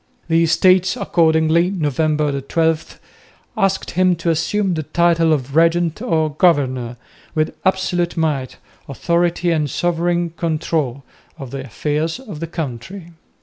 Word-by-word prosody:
The 165 0 +3
Estates 185 +3 +3
accordingly, 160 +1 +2
November 150 -4 0
12, 160 +3 -1 0.6
asked 195 -2 0
him 185 0 +2
to 170 0 -1
assume 185 +4 0
the 160 - -2
title 165 +1 +2
of 140 -2 -1
Regent 165 +2 +2
or 160 -10 0
Governor, 130 -7 +1 0.4
with 155 0 0
"absolute 180 -2 0
might, 145 -6 -1 0.3
authority 170 +5 0
and 155 -3 0
sovereign 175 +2 0
control" 155 -5 -2 0.3
of 135 -5 -8
the 135 -1 -5
affairs 150 - -2
of 210 - -9
the 165 - -4
country. 165 +4 -6
165 Hz, 125 wpm, -19 LUFS, 150-175 Hz, 0.6 s, The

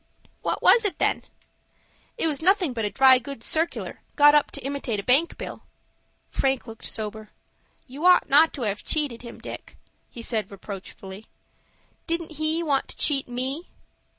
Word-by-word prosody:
"What - - -2
was 465 - +7
it, 410 - -1
then?" - - +1 1.0
"It 465 - +1
was 305 -2 -1
nothing 365 -4 +3
but 225 -3 -2
a - - 0
dry 260 +2 +6
goods 255 -2 -8
circular 325 +2 -1
got 290 -1 +7
up 295 -1 +4
to - - -7
imitate 275 -6 -2
a - - -5
bank 275 +9 +3
bill." - - -7 0.7
Frank 265 -1 0
looked 225 -2 -10
sober. 215 -1 -5 0.6
"You 275 +5 -9
ought 360 -1 +6
not 305 +4 +5
to 265 - -5
have 205 -2 -2
cheated 290 -7 -1
him, 235 -1 -10
Dick," - - -9 0.3
he 235 - -9
said, 220 -2 -2
reproachfully. 195 +1 -9 0.8
"Didn't 335 -1 -2
he 310 +2 0
want 280 -4 +1
to - - -6
cheat 275 -3 +2
me?" 260 +7 -4
270 Hz, 165 wpm, -25 LUFS, 225-315 Hz, 1.0 s, was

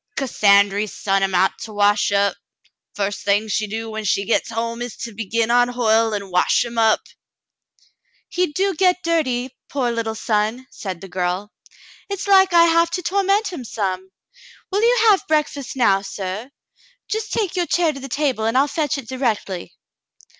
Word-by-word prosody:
" - - -34
Cassandry 205 -5 +3
sont 195 0 -1
him 190 -1 0
out 190 +2 +2
to 220 - -8
wash 205 0 +2
up. 200 0 +2 0.6
F'ust 205 0 -2
thing 205 +2 +1
she 215 0 -1
do 225 +2 -5
when 220 0 -5
she 200 0 0
gets 230 - 0
home 230 +1 -3
is 245 -2 -6
to 230 - -7
begin 225 +2 -1
on 245 0 +4
Hoyle 225 -2 +2
and 200 -2 -4
wash 180 +6 +2
him 235 -1 -4
up." 220 -1 +4 1.3
"He 360 +1 0
do 385 +5 0
get 365 +1 +3
that 335 0 +2
dirty, 255 -3 -2
poor 255 -4 -1
little 225 -1 -3
son," 220 +3 -1
said 185 -4 -6
the 195 - -8
girl. 185 +3 -3 0.6
"It's 400 0 -4
like 385 -1 +5
I 340 -1 +6
have 335 0 +3
to 360 +1 -3
torment 395 +3 +1
him 270 - -6
some. 190 -4 -3 0.6
Will 400 +2 +1
you 480 +1 +4
have 390 - +1
breakfast 295 -4 -1
now, 200 -7 +3
suh 195 +2 -5
.^ - - -23 0.6
Just 435 0 -3
take 405 -5 -1
your 350 -2 0
chair 335 -3 +2
to 275 - -8
the 270 0 -8
table, 260 -5 -1
and 225 +3 +1
I'll 275 +2 +4
fetch 295 -1 -1
it 265 -4 -8
directly." 220 -8 -3
230 Hz, 185 wpm, -21 LUFS, 205-310 Hz, 1.3 s, I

